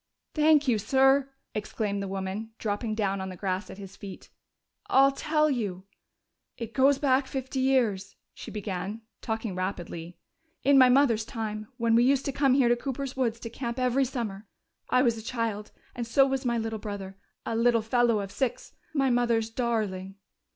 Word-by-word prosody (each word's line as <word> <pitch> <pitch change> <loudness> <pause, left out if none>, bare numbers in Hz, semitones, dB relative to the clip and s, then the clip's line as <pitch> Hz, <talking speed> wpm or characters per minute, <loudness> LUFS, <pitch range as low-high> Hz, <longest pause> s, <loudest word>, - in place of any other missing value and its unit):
"Thank 305 -2 +4
you, 230 -4 +3
sir!" 270 +4 +3 0.2
exclaimed 205 -1 -2
the 195 - -3
woman, 195 +3 -4
dropping 215 +1 -2
down 200 -3 -1
on 190 - -4
the 185 - -7
grass 190 +1 -3
at - - -9
his 200 -1 -10
feet. 195 -2 -10 0.6
"I'll 275 +1 +5
tell 305 +2 +1
you.... 205 -10 -2 0.7
"It 230 -1 -6
goes 275 +1 +4
back 270 -1 +2
fifty 265 0 -4
years," 230 -8 +1 0.2
she - - -9
began, 205 +1 -4 0.2
talking 220 -2 -3
rapidly, 175 -2 -5 0.5
"in 275 +1 +6
my 255 -1 +7
mother's 250 -4 +4
time, 215 -3 -5
when 230 -2 +1
we 235 +1 +5
used 270 +1 +3
to 275 - 0
come 270 -1 +3
here 265 -3 +4
to 240 - +4
Cooper's 270 +1 -4
woods 235 -3 0
to 230 - -5
camp 235 0 -4
every 255 +1 +2
summer.... 220 -5 -5 0.4
I 255 - +4
was 235 -3 +2
a - - -10
child 225 -4 -3 0.2
and 235 -1 -4
so 270 +4 +5
was 270 0 -2
my 235 -1 +1
little 225 -1 -3
brother. 200 -2 -6 0.3
A 230 - -2
little 230 -1 +3
fellow 230 -1 +2
of 195 -1 -6
six 260 +4 -3 0.2
my 270 -2 +2
mother's 235 -2 +1
darling.... 210 -6 -2
230 Hz, 180 wpm, -28 LUFS, 205-265 Hz, 0.7 s, my